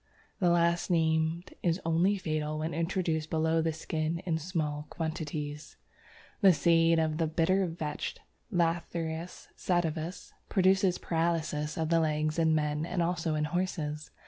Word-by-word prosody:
The 180 Hz, -4 st, +3 dB
last 170 Hz, +1 st, +2 dB
named 160 Hz, 0 st, +1 dB
is 170 Hz, 0 st, +1 dB
only 170 Hz, +5 st, +3 dB
fatal 155 Hz, -3 st, -2 dB
when 160 Hz, +2 st, -2 dB
introduced 165 Hz, -1 st, -1 dB
below 160 Hz, 0 st, +2 dB
the 160 Hz, 0 st, +1 dB
skin 160 Hz, +1 st, -2 dB
in 165 Hz, -3 st, 0 dB
small 150 Hz, -3 st, -3 dB
quantities. 155 Hz, -2 st, -5 dB, 0.6 s
The 195 Hz, -3 st, +7 dB
seeds 165 Hz, +1 st, +4 dB
of 155 Hz, -1 st, 0 dB
the 165 Hz, -, +2 dB
Bitter 180 Hz, +4 st, +2 dB
Vetch 160 Hz, -3 st, -4 dB, 0.4 s
(Lathyrus 170 Hz, -1 st, -2 dB
sativus) 170 Hz, -1 st, -2 dB, 0.2 s
produce 190 Hz, -1 st, +3 dB
paralysis 160 Hz, -2 st, -1 dB
of 160 Hz, -1 st, -1 dB
the 165 Hz, 0 st, +4 dB
legs 155 Hz, 0 st, 0 dB
in 160 Hz, -1 st, +3 dB
man 150 Hz, 0 st, 0 dB
and 175 Hz, +1 st, -1 dB
also 170 Hz, -2 st, 0 dB
in 150 Hz, -, 0 dB
horses. 155 Hz, -2 st, -2 dB
165 Hz, 140 wpm, -30 LUFS, 155-175 Hz, 0.6 s, The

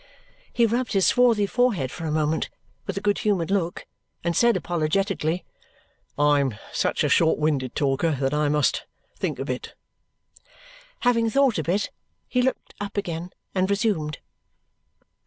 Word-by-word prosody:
He 235 Hz, -, +3 dB
rubbed 240 Hz, +2 st, 0 dB
his 195 Hz, -2 st, +3 dB
swarthy 235 Hz, -4 st, +4 dB
forehead 200 Hz, -, +1 dB
for 165 Hz, -, -6 dB
a 155 Hz, -, -1 dB
moment 155 Hz, +1 st, 0 dB, 0.4 s
with -, -, -3 dB
a -, -, -2 dB
good 205 Hz, -1 st, +1 dB
humoured 195 Hz, -5 st, 0 dB
look 175 Hz, -4 st, -1 dB, 0.4 s
and 170 Hz, -1 st, 0 dB
said 235 Hz, +5 st, +4 dB
apologetically, 175 Hz, +1 st, -1 dB, 0.7 s
"I 145 Hz, 0 st, +4 dB
am 135 Hz, -5 st, 0 dB, 0.2 s
such -, -, +1 dB
a -, -, +3 dB
short 160 Hz, -1 st, +4 dB
winded 145 Hz, -5 st, 0 dB
talker 145 Hz, +2 st, +1 dB
that 135 Hz, +1 st, 0 dB
I 150 Hz, 0 st, +2 dB
must 150 Hz, -1 st, +1 dB, 0.3 s
think -, -, -2 dB
a -, -, -4 dB
bit." -, -, -5 dB, 1.3 s
Having 230 Hz, -2 st, +3 dB
thought 260 Hz, -4 st, +3 dB
a -, -, -1 dB
bit, 190 Hz, +6 st, 0 dB, 0.4 s
he 250 Hz, -, +1 dB
looked 260 Hz, +1 st, -2 dB
up 205 Hz, 0 st, -5 dB
again 175 Hz, -3 st, -3 dB, 0.2 s
and 190 Hz, 0 st, +1 dB
resumed. 200 Hz, -, 0 dB
175 Hz, 155 wpm, -24 LUFS, 150-210 Hz, 1.3 s, swarthy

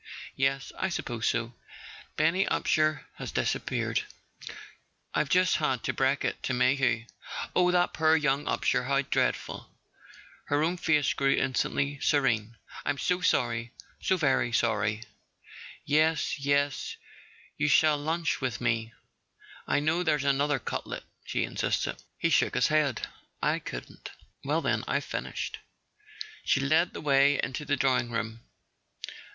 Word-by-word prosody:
Yes, 135 Hz, 0 st, 0 dB
I 190 Hz, -, 0 dB
suppose 120 Hz, -9 st, -3 dB
so. 115 Hz, 0 st, -1 dB, 0.6 s
Benny 165 Hz, +5 st, +2 dB
Upsher 155 Hz, 0 st, +1 dB
has -, -, -6 dB
disappeared—I've 150 Hz, -, -4 dB
just 180 Hz, 0 st, +4 dB
had 135 Hz, -5 st, 0 dB
to -, -, -1 dB
break 135 Hz, +1 st, +1 dB
it -, -, -2 dB
to 130 Hz, -, -1 dB
Mayhew." 125 Hz, -2 st, +2 dB, 0.5 s
"Oh, 180 Hz, 0 st, +4 dB
that 180 Hz, 0 st, +2 dB
poor 160 Hz, 0 st, +4 dB
young 145 Hz, -2 st, +1 dB
Upsher? 125 Hz, 0 st, 0 dB
How 140 Hz, 0 st, +2 dB
dreadful!" 135 Hz, -, -1 dB, 0.8 s
Her 145 Hz, +1 st, +1 dB
own 175 Hz, +3 st, 0 dB
face 150 Hz, -5 st, +2 dB
grew 135 Hz, 0 st, +2 dB
instantly 140 Hz, +2 st, 0 dB
serene. 120 Hz, -6 st, +1 dB, 0.3 s
"I'm 145 Hz, -, -1 dB
so 180 Hz, +5 st, 0 dB
sorry 120 Hz, -7 st, +1 dB, 0.3 s
—so 190 Hz, -, +2 dB
very 135 Hz, -7 st, +2 dB
sorry... 110 Hz, -2 st, +1 dB, 0.8 s
Yes, 155 Hz, +1 st, +2 dB
yes, 140 Hz, 0 st, 0 dB, 0.6 s
you 150 Hz, -, 0 dB
shall 150 Hz, 0 st, +4 dB
lunch 160 Hz, +1 st, -1 dB
with 125 Hz, -2 st, -2 dB
me—I 115 Hz, +4 st, -4 dB
know 155 Hz, +4 st, +1 dB
there's 150 Hz, -5 st, +1 dB
another 140 Hz, +1 st, +2 dB
cutlet," -, -, -5 dB, 0.2 s
she -, -, -1 dB
insisted. -, -, -1 dB, 0.2 s
He -, -, 0 dB
shook -, -, +3 dB
his -, -, +3 dB
head. 150 Hz, -6 st, +1 dB, 0.4 s
"I -, -, +1 dB
couldn't." -, -, -8 dB, 0.3 s
"Well, 150 Hz, +4 st, 0 dB
then, -, -, 0 dB
I've -, -, 0 dB
finished." -, -, -4 dB, 0.8 s
She -, -, +2 dB
led 155 Hz, +6 st, +2 dB
the -, -, -6 dB
way 140 Hz, -1 st, +4 dB
into 135 Hz, +3 st, -3 dB
the 145 Hz, 0 st, +1 dB
drawing 125 Hz, -2 st, +2 dB
room. 115 Hz, -1 st, -4 dB
140 Hz, 135 wpm, -28 LUFS, 125-155 Hz, 0.8 s, just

